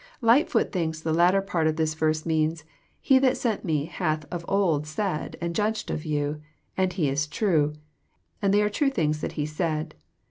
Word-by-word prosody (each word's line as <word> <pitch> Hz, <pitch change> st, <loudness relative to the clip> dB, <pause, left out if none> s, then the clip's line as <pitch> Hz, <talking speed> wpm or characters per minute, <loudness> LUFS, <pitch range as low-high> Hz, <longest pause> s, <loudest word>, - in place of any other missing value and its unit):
Ughtfoot 235 Hz, +6 st, +3 dB
thinks 160 Hz, -4 st, -2 dB
the 160 Hz, 0 st, -2 dB
latter 180 Hz, +4 st, +4 dB
part 170 Hz, -5 st, 0 dB
of 155 Hz, -, +1 dB
this 155 Hz, -1 st, 0 dB
verse 155 Hz, 0 st, 0 dB
means: 160 Hz, 0 st, 0 dB, 0.2 s
'< -, -, -39 dB
He 265 Hz, -2 st, +6 dB
that 260 Hz, -1 st, +3 dB
sent 225 Hz, -4 st, -1 dB
Me 155 Hz, -5 st, 0 dB
hath 155 Hz, -3 st, -2 dB
of 175 Hz, -1 st, -4 dB
old 170 Hz, -7 st, +1 dB
said 160 Hz, +1 st, -3 dB
and 170 Hz, 0 st, -3 dB
judged 215 Hz, +3 st, -1 dB
of 155 Hz, -, -4 dB
you, 150 Hz, 0 st, -2 dB, 0.3 s
and 185 Hz, -1 st, +1 dB
He 175 Hz, -5 st, 0 dB
is 140 Hz, +2 st, 0 dB
true, 150 Hz, -3 st, +1 dB, 0.7 s
and 200 Hz, -1 st, +2 dB
they 205 Hz, +1 st, +4 dB
are 210 Hz, -, +2 dB
true 280 Hz, +6 st, +2 dB
things 155 Hz, -, 0 dB
that -, -, -3 dB
He 150 Hz, -, -2 dB
said. 155 Hz, 0 st, -2 dB
160 Hz, 200 wpm, -26 LUFS, 155-195 Hz, 0.7 s, He